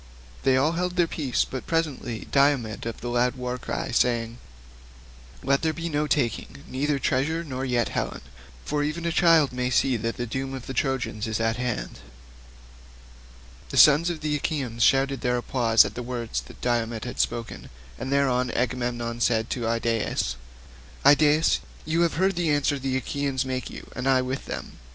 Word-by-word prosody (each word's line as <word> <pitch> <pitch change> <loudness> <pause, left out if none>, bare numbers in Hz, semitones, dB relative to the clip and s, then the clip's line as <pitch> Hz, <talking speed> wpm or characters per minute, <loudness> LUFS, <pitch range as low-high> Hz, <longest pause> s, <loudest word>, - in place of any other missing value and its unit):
They 130 -1 +3
all 145 +4 +3
held 180 +1 -2
their 175 -1 +4
peace, 145 -6 -1
but 130 - -6
presently 150 -8 -2
Diomed 135 -6 +2
of 115 - -6
the 120 - -5
loud 120 +1 +1
war 125 0 -4
cry - - -4
spoke, 115 - +4
saying, 115 -1 -1 1.1
"Let 140 +1 +2
there 160 -1 +1
be 170 +1 -4
no 150 -1 0
taking, 120 - -1
neither 140 +2 0
treasure, 145 +5 0
nor 130 -4 -5
yet 120 -3 +1
Helen, - - -3 0.4
for 150 0 -1
even 155 +3 -2
a 170 - +1
child 165 -5 +4
may 125 0 -1
see 130 0 +2
that 115 +1 -3
the 120 - -2
doom 135 +3 -4
of 130 - -8
the 135 - -5
Trojans 125 -4 -1
is 110 -1 -2
at 115 0 0
hand." 90 - -3 1.7
The - - -4
sons 150 +4 +7
of 165 -3 -4
the 150 -1 0
Achaeans 130 -6 -3
shouted 135 +1 +3
applause 120 -2 +3
at - - -5
the 125 - -5
words 120 -2 -3
that - - -15
Diomed 115 -2 -1
had 125 - -6
spoken, 115 -1 -2 0.3
and 130 - -4
thereon 130 -3 +2
King - - -4
Agamemnon 120 -1 -2
said 115 -1 +1
to 120 -3 -2
Idaeus, 115 - 0 0.7
"Idaeus, 150 +2 +5 0.3
you 160 +2 +1
have 170 -3 +2
heard 190 +3 +2
the 170 -2 0
answer 145 -1 +1
the 130 0 -1
Achaeans 135 +1 -2
make 130 -1 -3
you - - -10
and 125 +2 -1
I 130 -1 +4
with 130 +2 -4
them. - - -6
130 Hz, 180 wpm, -25 LUFS, 120-145 Hz, 1.7 s, sons